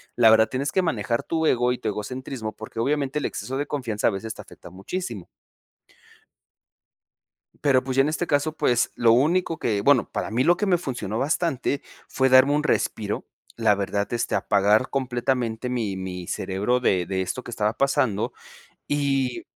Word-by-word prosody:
La 115 -2 +6
verdad 110 0 +6
tienes 135 +3 -2
que 190 - +2
manejar 115 - -1
tu 160 -1 -1
ego, 125 -2 +2
y 125 - -1
tu - - -4
egocentrismo, 110 +2 -5
porque, 110 +1 -9
obviamente 140 +3 0
el 145 - -3
exceso 135 +1 -4
de 145 - -1
confianza 120 -8 -3
a - - +5
veces 105 +3 -5
te - - -9
afecta - - -14
muchísimo. 100 - -6 2.4
Pero, 135 -3 +4
pues, 130 0 -3
ya - - +7
en 150 - 0
este 170 +2 -2
caso, 145 +2 +1
pues, 120 -5 +1
lo 115 -1 +4
único 165 +7 +2
que, 105 -3 0
bueno 140 +1 +3
para - - -4
mí 125 +3 +1
lo 175 - +5
que 210 - 0
me 180 -3 +3
funcionó 120 - -4
bastante, 145 -2 0 0.3
fue 130 0 +1
darme 130 +2 +6
un 150 +1 +1
respiro, 105 -7 -1 0.3
la 110 -3 +3
verdad 100 +1 -1
este 120 - -1
apagar 105 +5 +2
completamente 125 -3 -1
mi 115 -6 -2
mi 90 -2 -6
cerebro 105 +6 -1
de 95 -7 +1
de 95 0 -2
esto 95 +7 -4
que - - -8
estaba 105 -1 0
pasando 130 -6 +1 0.6
y 135 -3 0
125 Hz, 180 wpm, -24 LUFS, 110-140 Hz, 2.4 s, ya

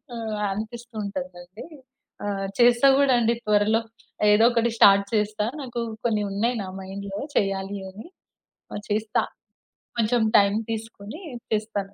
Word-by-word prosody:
ఆహ్! 220 -2 -4
అనిపిస్తూ 230 +4 -6
ఉంటాదండి. 185 0 -7 0.6
ఆహ్! 195 -1 -2
చేస్తా 240 +2 +6
గూడా 280 -2 +4
అండి 230 0 +2
త్వరలో, 210 +2 +3 0.5
ఏదోకటి 230 +2 +4
స్టార్ట్ 200 -1 +6
చేస్తా. 210 -1 0 0.2
నాకు 245 -3 -5 0.3
కొన్ని 215 -3 +1
ఉన్నాయి, 230 +5 0
నా - - -7
మైండ్‌లో 195 +1 -6 0.2
చేయాలి 195 0 -1
అని. 205 - -11 0.7
ఆహ్, 205 - -5
చేస్తా. 215 +1 0 0.8
కొంచెం 230 +1 +2
టైమ్ 200 0 +4
తీసుకొని 225 - -7 0.3
చేస్తాను. 210 -2 -2
210 Hz, 120 wpm, -24 LUFS, 200-230 Hz, 0.8 s, చేస్తా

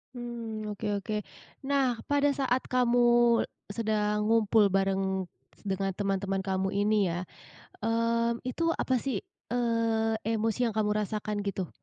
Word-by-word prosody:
Mmm, 230 -3 -5
oke 205 - -4
oke. 215 +2 -5 0.5
Nah, 270 -3 +2
pada 285 0 +2
saat 260 -2 0
kamu 245 -1 +2 0.7
sedang 210 -1 0
ngumpul 220 -2 +4
bareng 195 0 0 0.4
dengan 195 -1 -1
teman-teman 195 -1 -1
kamu 190 0 0
ini 205 +2 +2
ya, 175 +1 -2 0.6
eee, 230 +1 +2 0.2
itu 335 - -3
apa 260 - 0
sih, 240 -5 -2 0.3
eee, 230 -2 +1 0.2
emosi 225 +1 0
yang 225 - -1
kamu 210 -1 +1
rasakan 210 0 -3
gitu? 190 -3 -2
215 Hz, 125 wpm, -29 LUFS, 195-235 Hz, 0.7 s, ngumpul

